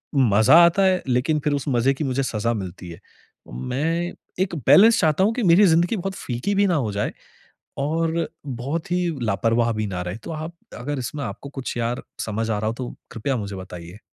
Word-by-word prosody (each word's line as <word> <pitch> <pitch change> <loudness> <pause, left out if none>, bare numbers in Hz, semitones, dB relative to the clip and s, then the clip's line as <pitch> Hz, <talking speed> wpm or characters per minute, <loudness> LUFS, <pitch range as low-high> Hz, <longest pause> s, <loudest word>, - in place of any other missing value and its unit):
मज़ा 110 +2 +5
आता 170 +3 +3
है 185 -1 +3
लेकिन 130 +5 +1
फ़िर 150 - +1
उस 140 - -2
मज़े 130 +1 +2
की 150 - -4
मुझे 135 0 0
सज़ा 115 -1 -1
मिलती 90 -3 -6
है। 85 +2 -10 0.5
मैं 160 - -2 0.3
एक 185 - -4
बैलेंस 225 +4 +7
चाहता 160 +2 +3
हूँ 215 - +3
कि 245 -1 -2
मेरी 185 +3 +6
ज़िंदगी 170 +5 +3
बहुत 190 0 -4
फीकी 125 +12 -3
भी 200 0 +3
ना 175 - +2
हो 125 -9 0
जाए 100 +1 -2 0.7
और 165 +3 0 0.2
बहुत 140 +8 -4
ही 180 0 +1 0.2
लापरवाह 115 +3 +1
भी 110 -1 -2
ना 90 -3 -4
रहे। 90 +2 -5
तो - - -6
आप 160 +2 -6 0.2
अगर 140 +3 -3
इसमें 135 +4 -4
आपको 115 +6 -7
कुछ 135 -3 -5
यार 120 +1 -2 0.2
समझ 110 +1 -2
आ 105 - 0
रहा 110 - -2
हो 110 - 0
तो 125 0 -6 0.2
कृपया 130 +4 -2
मुझे 100 -3 -5
बताइए? 90 0 -9
135 Hz, 205 wpm, -23 LUFS, 110-165 Hz, 0.7 s, बैलेंस